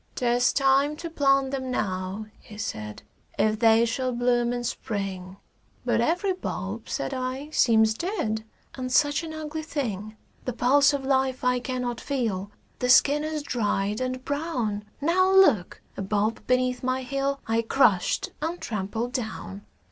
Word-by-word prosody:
"'Tis 245 0 +2
time 275 +2 +3
to 335 +1 -7
plant 275 -3 +2
them 260 -2 -3
now," 190 -2 -2
he 210 - -13
said, 105 - -5 0.3
"If 215 0 +2
they 225 0 +5
shall 255 +2 -1
bloom 240 0 +1
in 245 0 -2
Spring"; 195 -5 -4 0.5
"But - - +2
every 365 +4 +1
bulb," 215 - -5
said 135 - -2
I, 260 +3 -4
"seems 220 -6 +4
dead, 220 - -2 0.3
And 255 -1 -5
such 290 +5 +3
an 325 -1 -6
ugly 315 0 -5
thing." 220 - -4 0.3
"The 250 - -2
pulse 280 +4 +4
of 275 -2 -2
life 265 -1 +1
I 250 0 +2
cannot 245 -2 -3
feel, 220 -8 -2 0.3
The 250 - 0
skin 290 +4 +5
is 310 -1 -3
dried 210 -4 -1
and 255 0 -3
brown. 250 -9 -2 0.2
Now 370 +5 +3
look!" 295 - +4
a - - -5
bulb 210 +3 0
beneath 255 0 +1
my 255 0 -1
heel 275 +2 -1
I 225 +1 +1
crushed 225 -5 +2
and 330 +3 -2
trampled 220 +3 -3
down. 220 -5 -5
250 Hz, 155 wpm, -26 LUFS, 220-280 Hz, 0.5 s, they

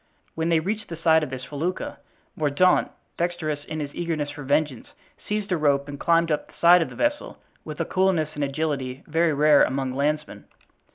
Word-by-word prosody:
When 160 +1 -1
they 165 -1 +4
reached 205 +6 -3
the 170 - -5
side 160 -1 +4
of 150 - -3
this 130 -1 -6
felucca, 155 +7 -4 0.4
Mordaunt, 155 +5 +2 0.3
dexterous 165 -4 -2
in 155 0 -5
his 145 -1 -5
eagerness 160 -4 -2
for 145 - -9
vengeance, 145 -2 0 0.4
seized 210 -1 -2
a 180 - +2
rope 140 -2 +1
and 145 -1 -7
climbed 165 -1 +2
up 150 - -1
the - - -21
side 175 +1 +7
of 165 - -1
the - - -11
vessel 295 0 -1 0.3
with - - -8
a - - 0
coolness 185 -5 +1
and 145 - -3
agility 140 -2 -3
very 160 0 +1
rare 150 0 +5
among 130 -1 -1
landsmen. 150 +3 -2
155 Hz, 190 wpm, -24 LUFS, 145-170 Hz, 0.4 s, side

